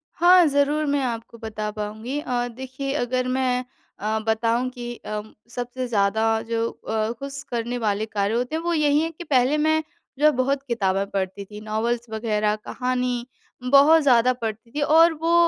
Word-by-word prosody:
हाँ, 355 +1 +6
ज़रूर 290 +2 +2
मैं 285 -1 +1
आपको 235 -1 -4
बता 215 -1 -4
पाऊँगी 220 +6 -4
अ, 245 -4 -1
देखिए 260 +3 -5
अगर 255 -1 0
मैं 255 -1 0 0.4
अ, 215 +1 -1
बताऊँ 230 +3 +1
कि 240 -1 -7
अ, 215 -2 -5 0.3
सबसे 245 +1 -4
ज़्यादा 215 0 +1 0.2
जो 230 0 0
अ, 220 0 -3
खुश 275 0 -6
करने 240 +1 -2
वाले 215 -2 0
कार्य 205 -1 -1
होते 250 +5 -1
हैं, 320 - -2
वो 345 0 0
यही 295 -2 +3
हैं 325 +1 -2
कि 330 +2 -9
पहले 275 -1 +2
मैं 315 +1 +2 0.4
जो 300 - +3
है 305 - +7
बहुत 270 +1 0
किताबें 195 -5 0
पढ़ती 195 0 -3
थी, 210 +1 -10
नॉवल्स 225 +2 -1
वग़ैरह 215 -1 0
कहानी 250 +2 -2 0.5
बहुत 295 +4 +7
ज़्यादा 250 -2 +4
पढ़ती 225 -1 -6
थी। 290 +3 -3
और 325 +3 +5
वो 325 +2 -1
245 Hz, 175 wpm, -23 LUFS, 220-280 Hz, 0.5 s, है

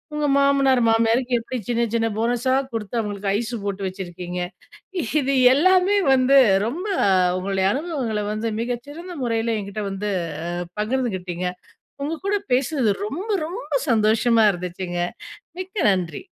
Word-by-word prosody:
உங்க 300 0 0
மாமனார் 275 -2 +4
மாமியாருக்கு 230 +2 +2
எப்படி 255 +3 -5
சின்ன 235 0 +1
சின்ன 225 -1 +2
போனஸா 240 +3 +1 0.2
குடுத்து 225 0 -4
அவங்களுக்கு 205 -2 -3
ஐஸ்ஸு 235 +1 -3
போட்டு 200 -1 -3
வச்சிருக்கீங்க. 180 -1 -6 0.8
இது 275 0 0 0.2
எல்லாமே 370 +6 +4 0.2
வந்து 265 +1 +4 0.3
ரொம்ப 335 - -4 0.5
உங்களுடைய 190 0 0
அனுபவங்கள 265 -8 -2
வந்து 220 +2 -2
மிகச் 240 0 -3
சிறந்த 340 +5 -8
முறையில 230 -1 0
என்கிட்ட 200 +2 -5
வந்து 205 +2 -3 0.4
அ - - -3 0.3
பகிர்ந்துகிட்டீங்க. 190 -7 -2 0.6
உங்ககூட 330 +7 -2 0.2
பேசுனது 260 -2 +1 0.2
ரொம்ப 360 - -5 0.2
ரொம்ப 345 -2 -7 0.2
சந்தோஷமா 225 +1 +3
இருந்துச்சுங்க. 175 0 -4 0.6
மிக்க 380 +3 -7
நன்றி! 185 - -2
230 Hz, 125 wpm, -22 LUFS, 205-275 Hz, 0.8 s, மாமனார்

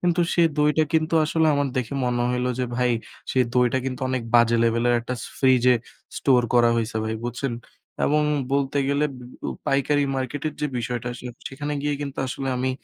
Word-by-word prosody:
কিন্তু 175 0 +1
সে 170 - +3 0.2
দইটা 150 +1 +3
কিন্তু 160 +1 +2
আসলে 160 +1 +2
আমার 140 -1 +1
দেখে 125 +1 -2
মনে 120 -1 0
হইল 125 0 0
যে 125 - +1
ভাই 125 0 +2 0.4
সে - - 0 0.2
দইটা 125 +1 +3
কিন্তু 130 0 -4
অনেক 130 -1 -1
বাজে 115 0 +5
লেভেলের 115 +1 +2
একটা 125 +2 -4 0.2
ফ্রিজে 125 -2 +5 0.4
store 125 -3 +3
করা 120 -1 +5
হইছে 115 0 -2
ভাই 110 0 -2
বুঝছেন? 120 +2 -3 0.5
এবং 150 +1 +3 0.3
বলতে 140 0 +1
গেলে 140 +1 +2
উব 135 -3 -10 0.3
উ - - -2 0.2
পাইকারি 145 +1 +2
মার্কেটের 140 +3 -3
যে 150 - +1
বিষয়টা 120 +1 -3
আসলে 125 0 -7 0.2
সেখানে 145 +2 -5
গিয়ে 145 0 0
কিন্তু 140 -2 -5
আসলে 135 +1 -4
আমি 130 +1 0
130 Hz, 180 wpm, -24 LUFS, 120-145 Hz, 0.5 s, বাজে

